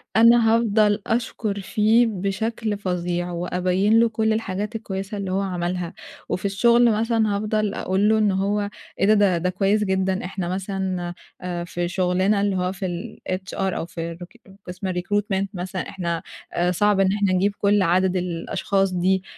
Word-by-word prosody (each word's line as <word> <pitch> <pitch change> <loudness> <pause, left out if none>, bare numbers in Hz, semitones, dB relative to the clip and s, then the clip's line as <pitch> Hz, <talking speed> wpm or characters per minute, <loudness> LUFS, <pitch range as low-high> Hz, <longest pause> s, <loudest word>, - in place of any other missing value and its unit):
أنا 230 0 +6
هافضل 215 -2 +2
أشكُر 225 -3 -1
فيه 220 +4 +3
بشكل 215 +2 -2
فظيع، 180 -2 -2
وأبيِّن 180 +5 +1
له 230 0 +4
كل 220 0 +1
الحاجات 210 0 -3
الكويسة 195 -2 -4
اللي 195 -2 -3
هو 190 +1 +1
عملها. 180 -2 -3 0.4
وفي 185 - -2
الشغل 235 +4 +4
مثلًا 220 -1 +1
هافضل 215 0 0
أقول 195 +2 +1
له 220 - +4
إن 210 -2 +3
هو 200 +2 0 0.3
إيه 205 +3 +5
ده؟ 200 -4 +3
ده 180 +2 0
كويس 195 +3 +1
جدًا. 190 -1 0
إحنا 180 -1 -4
مثلًا 185 -2 -3 0.3
آآ 175 -1 -3
في 175 0 -3
شُغلنا 185 +3 +1
اللي 200 -1 +1
هو 180 0 0
في 190 0 -5 0.5
الHR 185 +1 -2 0.3
أو - - -3
في 165 -1 -6
الrecr 175 +2 -14 0.2
قسم 185 +1 -4
الrecruitment 195 +2 -1
مثلًا 185 0 -4
إحنا 170 -3 -3 0.3
أ 175 +1 +1
صعب 205 +2 +2
إن 195 -1 +4
إحنا 200 -2 +1
نجيب 195 +2 +2
كل 205 0 +3
عدد 185 +1 +2
الأشخاص 180 +2 -1
دي 185 +1 +1
195 Hz, 160 wpm, -23 LUFS, 180-210 Hz, 0.5 s, أنا